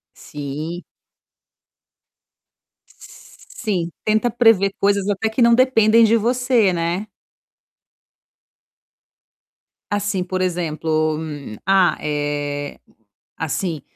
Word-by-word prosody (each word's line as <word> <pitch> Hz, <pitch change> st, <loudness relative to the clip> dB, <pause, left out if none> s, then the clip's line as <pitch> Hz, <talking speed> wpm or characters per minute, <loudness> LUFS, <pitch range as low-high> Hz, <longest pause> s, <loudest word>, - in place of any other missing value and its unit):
Sim. 150 Hz, +5 st, -6 dB, 2.1 s
Sim, 190 Hz, -, -6 dB
tenta 220 Hz, +3 st, +1 dB
prever 225 Hz, -4 st, +3 dB
coisas 200 Hz, -1 st, +1 dB
até 205 Hz, +2 st, 0 dB
que 220 Hz, +3 st, -2 dB
não 235 Hz, 0 st, +6 dB
dependem 230 Hz, -3 st, +4 dB
de 225 Hz, +1 st, +4 dB
você, 240 Hz, -3 st, +2 dB
né. 175 Hz, +4 st, -2 dB, 2.8 s
Assim 205 Hz, -2 st, -1 dB
por 185 Hz, +1 st, -3 dB
exemplo, 155 Hz, -3 st, -1 dB, 0.5 s
ah 190 Hz, -2 st, +3 dB
eh, 145 Hz, -1 st, -3 dB, 0.6 s
assim, 160 Hz, 0 st, -3 dB
190 Hz, 75 wpm, -20 LUFS, 160-220 Hz, 2.8 s, não